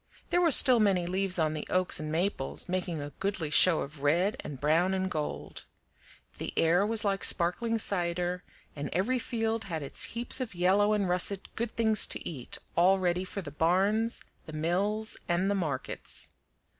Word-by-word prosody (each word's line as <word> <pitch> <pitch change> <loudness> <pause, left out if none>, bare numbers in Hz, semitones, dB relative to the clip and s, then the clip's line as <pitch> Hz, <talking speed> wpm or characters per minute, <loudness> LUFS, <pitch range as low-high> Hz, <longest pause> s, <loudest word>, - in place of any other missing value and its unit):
There 350 - +2
were 340 - +3
still 255 -4 +9
many 195 -5 +2
leaves 185 +1 -1
on 155 -2 0
the 155 - -6
oaks 185 0 +1
and 155 0 -5
maples, 165 -4 -2
making 180 -3 -3
a 145 0 -7
goodly 190 -6 -3
show 170 0 +5
of 140 0 -8
red 170 +8 +1
and 140 -3 -8
brown 165 +6 +1
and 190 0 -2
gold. 155 -3 -5 0.7
The - - -5
air 170 +4 +3
was 220 -1 +5
like 195 -1 -1
sparkling 225 +7 +2
cider, 180 -3 -2 0.3
and 145 -1 -5
every 230 +9 0
field 225 -2 -3
had 165 -5 -5
its 140 - 0
heaps 240 +3 +2
of 230 -7 -5
yellow 195 +4 +2
and 205 -2 0
russet 180 +2 -1
good 235 0 -3
things 220 -2 +2
to - - -5
eat, 135 -8 -5 0.2
all 185 +3 +4
ready 180 -1 -1
for 190 +1 -7
the 145 - -8
barns, 195 +9 0 0.2
the 155 - -9
mills, 195 +8 -1
and 180 +3 +1
the - - +1
markets. 155 -9 -4
185 Hz, 180 wpm, -28 LUFS, 165-205 Hz, 0.7 s, still